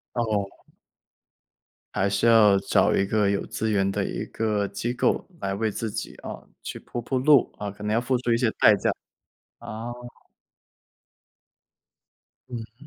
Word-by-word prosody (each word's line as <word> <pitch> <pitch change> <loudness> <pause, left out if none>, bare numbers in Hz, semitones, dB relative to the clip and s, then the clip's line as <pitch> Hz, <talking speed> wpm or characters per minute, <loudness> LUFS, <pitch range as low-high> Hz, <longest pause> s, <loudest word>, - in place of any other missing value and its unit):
哦。 110 -4 0 1.5
还 100 +1 +1
是 100 - +1
要 110 -4 +6
找 - - +2
一 100 - +2
个 105 -1 +2
有 100 - -1
资 110 0 -2
源 100 -2 +2
的 100 - -1
一 - - -3
个 105 -2 0
机 120 +4 -3
构 125 - +1 0.2
来 95 0 -2
为 110 +2 0
自 110 +2 -3
己， 105 - -5
呃， - - -8
去 - - -7
铺 120 - -5
铺 130 +3 -1
路 140 -1 +5
啊， 105 - -5
呃， 100 - -4
可 105 +1 -10
能 105 +1 0
要 115 - +3
付 125 +1 0
出 120 -1 0
一 115 - +4
些 120 -2 +2
代 105 - +7
价。 100 - 0 0.7
啊。 115 +2 -7 2.6
嗯。 120 +3 -9
110 Hz, 175 characters per minute, -25 LUFS, 100-120 Hz, 2.6 s, 代